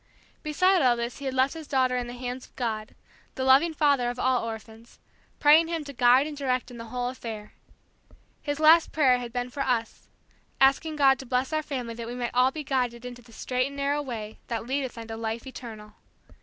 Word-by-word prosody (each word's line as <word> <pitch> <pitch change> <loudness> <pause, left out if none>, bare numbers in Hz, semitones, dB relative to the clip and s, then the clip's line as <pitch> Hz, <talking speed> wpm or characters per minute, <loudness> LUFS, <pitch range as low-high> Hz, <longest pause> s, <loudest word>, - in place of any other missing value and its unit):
Beside 365 +5 +3
all 250 -3 +4
this 235 +2 -4
he 280 - -7
had 265 - -2
left 260 +1 +2
his 320 -2 -9
daughter 260 -2 +1
in 245 -1 -2
the 240 - -7
hands 250 +1 -6
of - - -33
God, 220 -3 -3 0.4
the 260 - -2
loving 270 +6 +5
Father 285 -5 +2
of 245 - -5
all 255 0 +1
orphans, 225 0 -9 0.4
praying 310 +3 +6
Him 330 -2 -3
to 285 -1 -9
guide 250 +2 +5
and 305 -1 -6
direct 255 -3 -2
in 240 - -10
the 230 - -7
whole 245 +2 -3
affair. 225 -4 -8 0.9
His 290 0 -3
last 315 +2 +6
prayer 260 -5 +3
had 240 -1 -6
been 245 +1 -3
for 280 - -4
us; 240 -4 -2 0.5
asking 275 +4 +3
God 270 -3 +4
to 265 - -9
bless 255 +4 0
our 310 - +1
family 255 -6 -5
that 230 0 -7
we 240 - -5
might 245 -1 -3
all 250 +1 +4
be 300 +3 -6
guided 250 -3 -1
into 245 0 -8
the 235 -1 -19
straight 250 +3 -1
and 280 - -9
narrow 280 +1 0
Way 225 -6 -6
that 230 -1 -3
leadeth 260 -1 -3
unto 225 0 -7
life 225 +1 -4
eternal. 220 -5 -9
255 Hz, 215 wpm, -27 LUFS, 240-280 Hz, 0.9 s, praying